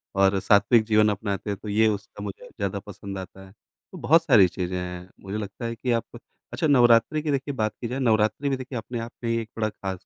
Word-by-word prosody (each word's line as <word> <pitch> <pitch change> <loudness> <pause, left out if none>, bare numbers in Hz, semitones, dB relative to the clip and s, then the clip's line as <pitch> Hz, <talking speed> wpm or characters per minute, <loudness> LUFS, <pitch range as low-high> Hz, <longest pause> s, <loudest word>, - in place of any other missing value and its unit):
और 95 0 +3
सात्विक 110 +4 +4
जीवन 110 -1 +4
अपनाते 100 0 -3
हैं 100 - -2
तो 105 - -5
ये 110 +2 +3
उसका 105 0 -4
मुझे 100 -2 -7
ज़्यादा 100 0 -3
पसंद 100 0 -8
आता 95 +1 -9
है, 95 - -16 0.4
तो - - -9
बहुत 165 +3 +4
सारी 110 - +6
चीज़ें 90 +1 -4
हैं। 90 0 -6
मुझे 100 +2 -5
लगता 105 +2 -6
है 115 0 -3
कि 125 +2 -2
आप 115 -1 +1 0.5
अच्छा 160 - 0
नवरात्रि 125 +2 +4
की 150 -1 -2
देखिए 140 +1 -2
बात 110 -3 -1
की 120 - -2
जाए 125 +3 -4
नवरात्रि 110 +3 +1
भी 135 - +1
देखिए 130 0 -6
अपने 115 +1 -5
आप 115 +1 -6
में 115 - -1
ही 115 - +1
एक 110 - -9
बड़ा 110 -1 0
ख़ास 95 -3 -7
110 Hz, 240 wpm, -25 LUFS, 100-120 Hz, 0.5 s, सारी